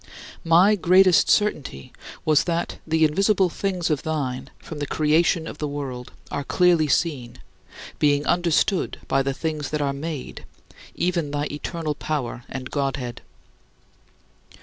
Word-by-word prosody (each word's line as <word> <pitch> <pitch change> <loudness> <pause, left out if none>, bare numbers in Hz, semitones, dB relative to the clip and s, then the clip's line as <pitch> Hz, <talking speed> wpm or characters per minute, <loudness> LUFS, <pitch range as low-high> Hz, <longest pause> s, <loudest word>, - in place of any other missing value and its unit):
My 175 +5 +5
greatest 185 -1 +5
certainty 150 - 0 0.3
was 155 +1 +3
that 170 -1 -2
"the 160 0 +3
invisible 195 +4 +2
things 180 -1 -2
of 150 - 0
thine 140 -5 -3
from 155 - -9
the 145 - -3
creation 160 +3 +2
of - - -8
the 150 - -2
world 135 -4 -6 0.2
are 140 - -2
clearly 175 -1 +3
seen, 130 -6 -1 0.6
being 145 0 +2
understood 175 +2 +1
by 135 - +2
the 135 0 -2
things 155 -2 -3
that 150 - -2
are 140 -1 0
made, 150 -1 -6 0.5
even 170 -4 0
thy 145 0 -2
eternal 155 +1 -3
power 135 -5 -4
and 130 -1 -6
Godhead." 135 -4 -3
155 Hz, 135 wpm, -23 LUFS, 140-170 Hz, 0.6 s, My